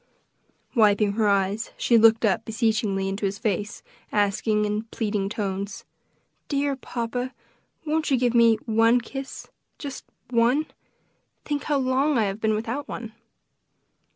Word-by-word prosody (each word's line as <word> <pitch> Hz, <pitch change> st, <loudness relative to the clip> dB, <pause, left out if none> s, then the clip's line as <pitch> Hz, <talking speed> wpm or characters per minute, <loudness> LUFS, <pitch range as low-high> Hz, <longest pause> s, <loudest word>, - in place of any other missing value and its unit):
Wiping 210 Hz, -3 st, +4 dB
her 215 Hz, +1 st, +1 dB
eyes, 200 Hz, +2 st, +1 dB
she 235 Hz, -, +2 dB
looked 225 Hz, 0 st, +6 dB
up 200 Hz, -, +1 dB
beseechingly 215 Hz, -3 st, 0 dB
into 195 Hz, +2 st, -4 dB
his 195 Hz, +1 st, -4 dB
face, 205 Hz, -1 st, -2 dB, 0.3 s
asking, 210 Hz, +1 st, +1 dB
in 210 Hz, +1 st, -2 dB
pleading 210 Hz, -3 st, -2 dB
tones, 200 Hz, -1 st, -4 dB, 0.6 s
"Dear 280 Hz, -1 st, 0 dB
papa, 245 Hz, 0 st, -4 dB, 0.5 s
won't 310 Hz, 0 st, 0 dB
you 270 Hz, -, +3 dB
give 245 Hz, -1 st, +1 dB
me 230 Hz, -1 st, +6 dB
one 225 Hz, +2 st, +4 dB
kiss 270 Hz, +3 st, -7 dB, 0.3 s
just 280 Hz, -2 st, -7 dB, 0.3 s
one? 245 Hz, +6 st, +3 dB, 0.8 s
Think 290 Hz, -1 st, -2 dB
how 295 Hz, -2 st, +1 dB
long 265 Hz, +2 st, +2 dB
I 225 Hz, -, +3 dB
have 200 Hz, +1 st, -3 dB
been 220 Hz, -1 st, +2 dB
without 235 Hz, +7 st, -3 dB
one." 225 Hz, -3 st, -7 dB
225 Hz, 135 wpm, -25 LUFS, 210-255 Hz, 0.8 s, looked